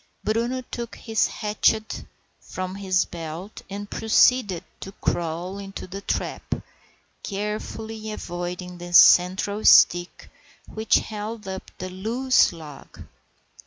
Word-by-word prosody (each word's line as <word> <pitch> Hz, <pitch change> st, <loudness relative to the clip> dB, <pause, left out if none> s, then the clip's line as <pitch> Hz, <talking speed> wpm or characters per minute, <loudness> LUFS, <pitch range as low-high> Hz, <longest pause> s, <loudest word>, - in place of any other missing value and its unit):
Bruno 235 Hz, +4 st, 0 dB
took 235 Hz, -1 st, -5 dB
his 225 Hz, -2 st, 0 dB
hatchet 215 Hz, 0 st, 0 dB, 0.3 s
from 185 Hz, 0 st, -6 dB
his 190 Hz, -2 st, +1 dB
belt 170 Hz, +4 st, -8 dB
and 205 Hz, +1 st, -6 dB
proceeded 220 Hz, -3 st, +3 dB, 0.2 s
to 195 Hz, -, -8 dB
crawl 175 Hz, +4 st, -3 dB
into 195 Hz, -1 st, -7 dB
the 195 Hz, +2 st, -7 dB
trap, -, -, -3 dB, 0.7 s
carefully 215 Hz, +2 st, -5 dB
avoiding 180 Hz, -2 st, -6 dB
the 175 Hz, 0 st, -8 dB
central 190 Hz, +4 st, +6 dB
stick 175 Hz, 0 st, +5 dB, 0.3 s
which 220 Hz, 0 st, +1 dB
held 215 Hz, 0 st, -3 dB
up 190 Hz, 0 st, -6 dB
the 185 Hz, 0 st, -6 dB
loose 235 Hz, +8 st, +2 dB
log. 155 Hz, -5 st, -11 dB
195 Hz, 110 wpm, -24 LUFS, 180-220 Hz, 0.7 s, central